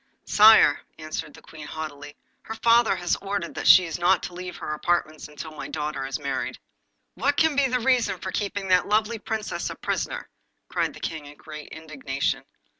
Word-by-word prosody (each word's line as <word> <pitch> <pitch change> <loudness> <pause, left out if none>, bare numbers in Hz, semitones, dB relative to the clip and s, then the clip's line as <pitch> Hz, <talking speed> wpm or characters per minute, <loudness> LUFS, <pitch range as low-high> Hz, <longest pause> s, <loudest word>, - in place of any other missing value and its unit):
'Sire,' 215 -8 +7 0.2
answered 155 -1 -5
the - - -16
Queen 155 -2 -11
haughtily, 145 -2 -7 0.3
'her 225 - -7
father 230 -2 +4
has 175 -1 0
ordered 195 -4 -4
that - - -3
she 185 -2 +8
shall 165 - -5
not 180 +1 +3
leave 180 0 -7
her - - -6
own - - -1
apartments 155 -1 -1
until 150 +1 -9
my 155 - -7
daughter 150 -3 -3
is 135 - -3
married.' 140 -2 -3 0.6
'What 275 +9 0
can 320 -2 +3
be 280 -1 +3
the 250 0 0
reason 250 0 +2
for - - -5
keeping 200 -2 -3
that 180 -1 +4
lovely 215 +2 +1
Princess 220 0 -3
a - - -6
prisoner?' - - -3 0.4
cried - - -1
the - - -11
King 155 -3 -5
in 145 0 -13
great 155 -1 -10
indignation. 145 -4 -3
175 Hz, 190 wpm, -25 LUFS, 150-220 Hz, 0.6 s, she